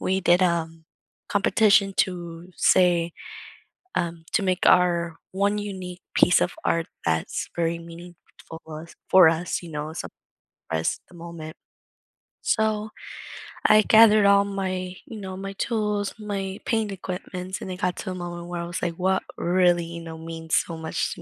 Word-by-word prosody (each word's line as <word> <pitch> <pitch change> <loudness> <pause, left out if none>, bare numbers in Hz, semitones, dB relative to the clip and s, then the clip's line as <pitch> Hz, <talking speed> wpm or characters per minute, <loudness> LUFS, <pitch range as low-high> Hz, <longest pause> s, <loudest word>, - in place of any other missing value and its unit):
we 190 +1 0
did, 175 0 +4
um, 165 -2 0 0.4
competition 200 -1 +3
to 175 -1 -2
say, 175 -2 +3 0.8
um, 165 -1 -2
to 210 - +2
make 185 -1 +1
our 170 -2 +3 0.2
1 200 +2 +1
unique 185 -3 -6
piece 180 - +5
of - - +1
art 165 0 +1 0.2
that's 80 0 -1
very 170 0 0
meaningful 170 +1 -11 0.5
us 160 +2 -9
for 185 -3 +8
us, 165 +3 -1
you 170 - -9
know, 150 0 -4
as 160 - -6
some - - -7 0.6
as 80 0 0
the 180 - -16
moment. 165 -1 -8 0.9
So 215 -1 0 0.8
I 215 0 +7
gathered 215 -1 +6
all 200 0 +5
my 185 -2 -3
you 230 -7 -9
know, 190 -2 -6
my 195 +1 -6
tools, 210 -1 -1
my 200 -2 -4
paint 220 -3 0
equipments, 185 0 -6
and 190 - -5
it 180 - -7
got 180 -1 0
to 185 - -5
a - - -5
moment 175 -1 -6
where 175 -1 -4
I - - -4
was 175 0 -5
like, 170 -2 -2
"What 190 +1 +1
really, 175 -1 +3
you 170 0 -7
know, 165 -1 -8
means 160 0 -3
so 170 - 0
much 160 0 -2
to - - -11
180 Hz, 165 wpm, -25 LUFS, 170-195 Hz, 0.9 s, for